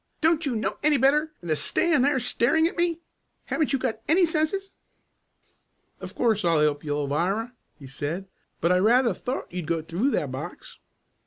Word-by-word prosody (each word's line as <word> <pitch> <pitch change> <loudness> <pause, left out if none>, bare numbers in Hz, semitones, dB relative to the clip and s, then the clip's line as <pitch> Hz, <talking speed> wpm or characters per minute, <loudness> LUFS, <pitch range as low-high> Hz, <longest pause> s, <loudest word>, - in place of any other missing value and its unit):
Don't 325 -1 +2
you 255 - -1
know 210 -2 -2
any 300 -1 +4
better 295 +4 +3
than 175 - -8
to 155 - +2
stand 305 - +1
there 280 -1 +2
staring 250 +7 +2
at 335 - -1
me? 340 -1 0 0.4
Haven't 310 - 0
you 275 - +2
got 240 -4 -3
any 345 +4 +5
senses?" 335 +5 -1 1.3
"Of - - -9
course 220 -4 +1
I'll 165 -3 +3
help 150 -1 +1
you, 145 -1 -2
Alvirah," 175 - -1 0.3
he 140 - -12
said. 150 +8 -5 0.4
"I 180 +2 +4
rather 235 +3 +4
thought 250 +8 -5
you'd 180 -3 -4
go 165 -2 -1
through 175 - 0
that - - -1
box." - - -8
235 Hz, 175 wpm, -25 LUFS, -, 1.3 s, any